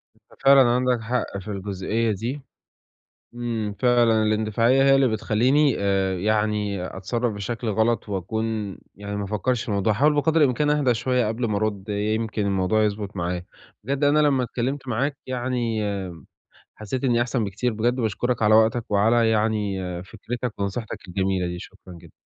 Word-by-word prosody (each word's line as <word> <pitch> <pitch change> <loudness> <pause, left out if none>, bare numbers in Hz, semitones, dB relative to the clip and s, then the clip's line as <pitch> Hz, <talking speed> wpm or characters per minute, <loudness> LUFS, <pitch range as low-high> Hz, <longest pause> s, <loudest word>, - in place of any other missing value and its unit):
أنت - - -24
فعلًا 135 -3 +7
عندَك 125 0 +2
حق 115 -3 -2
في 95 - -12
الجزئية 100 +3 -2
دي، 120 +8 -4 0.9
إمم، 115 -4 -3
فعلًا 120 -3 +3
الاندفاعية 110 +4 +2
هي 135 0 +6
اللي 135 -2 +4
بتخليني 125 +6 +2
آآ 95 -1 +1
يعني 105 -2 0
أتصرف 115 +5 -2
بشكل 115 +3 -4
غلط 110 +1 +1
وأكون 105 +1 -3 0.2
يعني 100 +1 -6
ما 100 - -2
أفكرش 110 +4 -1
في - - -10
الموضوع، 100 +1 +1
هاحاول 145 +7 +3
بقدر 160 +2 +2
الإمكان 145 +2 +2
أهدى 140 -5 +2
شوية 125 -1 0
قبل 115 +2 -2
ما 105 - 0
أرد، 105 -1 -2
يمكن 105 0 -1
الموضوع 100 +3 +1
يضبط 100 -1 -3
معايا. 90 0 -3 0.4
بجد 140 +3 -1
أنا 145 +1 +4
لمّا 140 -4 +3
اتكلمت 130 +3 -3
معاك 135 +5 -1
يعني 120 -3 -2 0.9
حسّيت 115 +5 -5
إني 120 -2 +2
أحسن 120 -2 0
بكتير 105 +5 -2
بجد 120 +4 0
وباشكرك 115 +1 -1
على 105 +1 +5
وقتك 110 +1 +3
وعلى 115 +3 +3
يعني 105 -2 0 0.3
فكرتك 120 +3 -5
ونصيحتَك 100 0 -4
الجميلة 95 -1 -1
دي، 90 0 -4
شكرًا 95 -1 -12
جدًا. 85 0 -15
110 Hz, 155 wpm, -24 LUFS, 100-125 Hz, 0.9 s, فعلًا